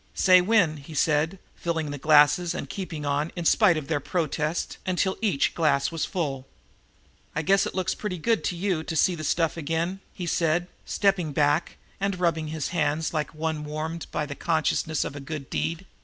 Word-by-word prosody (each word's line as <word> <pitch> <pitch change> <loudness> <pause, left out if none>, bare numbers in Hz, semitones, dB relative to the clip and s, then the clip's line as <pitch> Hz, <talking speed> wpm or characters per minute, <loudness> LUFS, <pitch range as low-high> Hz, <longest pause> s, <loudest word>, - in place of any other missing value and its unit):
"Say, 185 -1 +6
when," 180 -6 +3
he 145 +2 -11
said, 155 +5 +2 0.2
filling 160 -3 -2
the 145 - -5
glasses 155 +4 +5
and - - -4
keeping 165 -6 -5
on, 145 +3 0
in 175 -2 -4
spite 185 -2 +5
of 150 -3 -4
their 160 -3 0
protests, 155 +1 -2
until 190 +1 0
each 185 -11 +1
glass 155 -4 +2
was 165 -1 -1
full. 135 -7 -3 0.9
"I 150 - 0
guess 195 +4 +3
it - - -7
looks 190 0 0
pretty 205 -4 -4
good 225 +7 +1
to 180 - -1
you 180 -2 0
to 160 - -4
see 180 +3 +3
the 155 -2 -6
stuff 165 +2 +1
again," 165 +4 -2
he 180 - -6
said, 170 +1 +1 0.2
stepping 190 -7 +1
back 145 +3 +1 0.2
and 195 -2 -1
rubbing 165 -3 +1
his 155 -1 -3
hands 160 -1 0
like 155 0 -2
one 155 -1 -2
warmed 155 +2 -4
by 150 - -2
the 145 - -6
consciousness 155 0 0
of - - -5
a - - -5
good 145 -1 -7
deed. 165 +3 -2
160 Hz, 190 wpm, -26 LUFS, 150-180 Hz, 0.9 s, Say